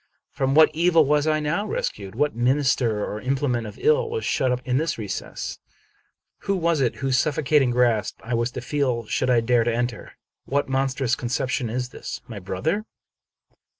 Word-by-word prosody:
From 135 0 0
what 160 0 +7
evil 165 -1 +4
was 150 +2 +2
I 155 0 +2
now 165 +8 -1
rescued? 100 - -4
What 145 +4 +1
minister 125 -3 +1
or 105 - -5
implement 130 -3 -1
of 105 - -10
ill 460 +1 +3
was 450 0 -3
shut 130 - +1
up 125 - 0
in 125 0 +1
this 160 +2 -1
recess? 105 -4 -5 0.8
Who 195 - -1
was 170 -4 +1
it 125 - +1
whose 130 -2 +2
suffocating 145 -2 +2
grasp 120 -3 +1
I 120 - -4
was 115 +1 +1
to - - -5
feel 125 -3 -1
should 130 +4 -1
I 120 -2 +4
dare 120 0 +3
to 120 - 0
enter 120 0 -2
it? - - -16 0.3
What 140 +1 0
mon 135 0 +1
strous 130 -2 0
conception 125 0 -2
is 125 +2 -3
this? - - -7
My 110 -5 -7
brother? 135 - -2
130 Hz, 185 wpm, -24 LUFS, 120-150 Hz, 0.8 s, what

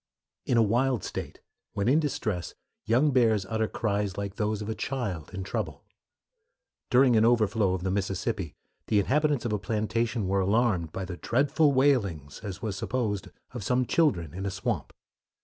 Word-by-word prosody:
In 120 - +2
a 115 - +6
wild 120 +1 +1
state, - - -6 0.3
when 100 +1 -1
in 140 +5 +5
distress, 110 - -2 0.3
young 130 +7 +3
bears 110 -6 +3
utter 110 +2 -1
cries 105 -4 -1
like 100 -1 -3
those 105 -1 0
of - - -7
a 110 - -1
child 110 - -4
in 95 - -5
trouble. 100 - -4 1.1
During 125 -1 +5
an 110 - +5
overflow 110 -4 +3
of 90 - -5
the 95 - 0
Mississippi 95 -2 -2 0.3
the 105 - +2
inhabitants 145 +4 +1
of 115 - -1
a 105 - 0
plantation 110 +1 -1
were 100 +1 +1
alarmed 100 -5 +1
by 95 +2 -4
the 90 -1 -6
dreadful 145 - +2
wailings, 105 - +1
as 100 -1 -7
was 105 -3 -2
supposed, 105 -2 -2 0.2
of 120 -5 -6
some 125 +5 +1
children 105 - +1
in 95 +2 -4
a - - 0
swamp. 100 - -3
110 Hz, 170 wpm, -28 LUFS, 95-120 Hz, 1.1 s, a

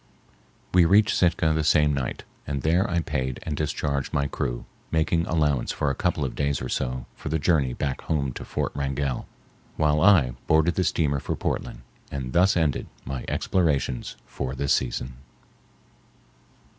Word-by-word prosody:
We 90 -1 +7
reached 105 +6 +4
Sitka 85 -3 +3
the 80 0 0
same 75 0 +4
night, 65 -3 -3 0.2
and 70 -2 -3
there 85 +5 +2
I 85 -1 +1
paid 65 -4 -2
and 75 - -3
discharged 70 -2 -2
my 70 - +2
crew, - - -3 0.2
making 80 +1 +1
allowance 75 -5 +1
for 75 - 0
a - - -3
couple 80 -3 0
of 65 - -4
days 70 -1 0
or 65 - -5
so 65 -1 -2
for - - -7
the 80 - +1
journey 75 -5 +2
back 70 0 -3
home 70 -5 -1
to - - -7
Fort - - -2
Wrangell, 70 -1 -2 0.5
while 75 -1 +2
I 85 -11 +6 0.2
boarded 80 +2 +4
the 95 - +1
steamer 75 -5 +1
for - - -3
Portland - - -3 0.3
and 65 -2 -5
thus 90 +3 +4
ended 80 -5 0 0.2
my 65 -2 -4
explorations 70 -9 0
for 65 -1 -5
this 70 +1 +1
season. 65 0 -2
75 Hz, 165 wpm, -25 LUFS, 65-80 Hz, 0.5 s, We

